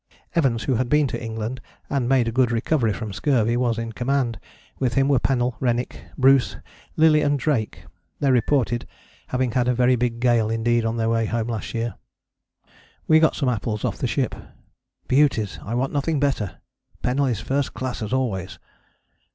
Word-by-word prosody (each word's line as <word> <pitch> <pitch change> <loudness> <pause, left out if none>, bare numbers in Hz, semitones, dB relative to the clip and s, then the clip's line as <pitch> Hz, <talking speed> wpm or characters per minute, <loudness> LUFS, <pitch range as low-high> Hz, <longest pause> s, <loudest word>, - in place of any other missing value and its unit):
Evans, 130 -9 +1
who 135 - 0
had 125 0 -1
been 150 0 +4
to 125 - -4
England 115 +2 -4 0.3
and 130 -4 -1
made 130 -3 +3
a - - 0
good 125 0 +2
recovery 120 0 +1
from 105 0 -5
scurvy, 120 -2 +1
was 120 -2 +1
in 115 0 -4
command: 125 0 -1 0.4
with 125 -2 0
him 135 0 +3
were 140 -3 +3
Pennell, 125 -2 0
Rennick, 120 -1 -2
Bruce, 135 0 +4 0.4
Lillie 155 -1 +5
and 145 -1 +2
Drake. 130 -6 -1 0.4
They 140 -2 +2
reported 120 -1 +1 0.4
having 125 -1 0
had 125 +1 +1
a 125 - +2
very 125 +1 +4
big 120 -1 -1
gale 120 -3 +2
indeed 115 +1 +1
on 115 +1 -1
their 115 0 0
way 115 -1 +1
home 115 0 -2
last 115 0 -4
year. 115 0 -2 1.1
We 160 0 +6
got 160 -1 +3
some 140 - -1
apples 110 -3 -1
off - - -2
the - - 0
ship, - - -1 0.7
"beauties, 130 -7 +2
I 115 - -4
want 130 +2 -1
nothing 145 +1 0
better.... 135 -9 -1 0.5
Pennell 135 +3 +1
is 115 -5 -1
first 135 +2 -2
class, 130 -2 -4
as 105 0 -4
always...." 120 -9 -2
125 Hz, 180 wpm, -23 LUFS, 115-135 Hz, 1.1 s, We